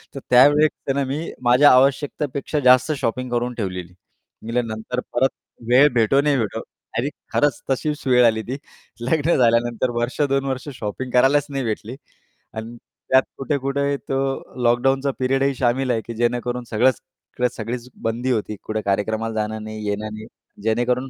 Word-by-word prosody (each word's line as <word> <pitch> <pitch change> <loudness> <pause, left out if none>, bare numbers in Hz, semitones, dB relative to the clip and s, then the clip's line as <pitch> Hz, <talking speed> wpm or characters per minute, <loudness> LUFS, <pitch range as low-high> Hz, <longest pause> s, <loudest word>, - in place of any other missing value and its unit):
तर - - -4
त्यावेळेस 145 +2 +4
ना 140 - +1
मी 145 +5 -4
माझ्या 125 +4 +6
आवश्यकतेपेक्षा 140 +2 +1
जास्त 130 +3 +5
शॉपिंग 125 -1 -2
करून 120 +1 -1
ठेवलेली. 90 -5 -5 0.5
म्हटले, 115 +2 -1
नंतर 110 +2 -4
परत 130 +2 +3 0.4
वेळ 130 +4 +7
भेटो, 120 +4 +3
नाही 145 -1 +2
भेटो 110 -4 -2 0.4
आणि 130 +5 0 0.2
खरंच 145 -4 +2
तशीच 150 +3 -2
वेळ 125 -1 +5
आली. 110 -1 +3
ती 130 +3 -5 0.4
लग्न 160 +6 +1
झाल्यानंतर 120 0 +2
वर्ष 125 +5 -2
2 135 0 +1
वर्ष 130 +1 -3
शॉपिंग 120 +5 -4
करायलाच 135 +3 +4
नाही 135 -1 -3
भेटली. 110 +2 -4 0.6
आणि 115 +2 -7 0.3
त्यात 130 0 +6
कुठे-कुठे 140 0 -1
तो 135 - 0 0.5
लॉकडाउनचा 135 +3 +2
पिरियडही 135 +1 +1
शामिल 130 +1 +1
आहे, 115 -2 0
की 115 - -8
जेणेकरून 120 +1 -1
सगळंच 125 +3 +2 0.5
सगळीच 120 +2 -5 0.2
बंदी 120 +3 -1
होती. 110 -2 -1
कुठे 110 0 -3
कार्यक्रमाला 110 +3 -1
जाणं 110 0 -2
नाही, 110 0 -7
येणं 105 +1 -3
नाही 110 0 -8 0.4
जेणेकरून 120 +4 0
125 Hz, 150 wpm, -22 LUFS, 115-135 Hz, 0.6 s, वेळ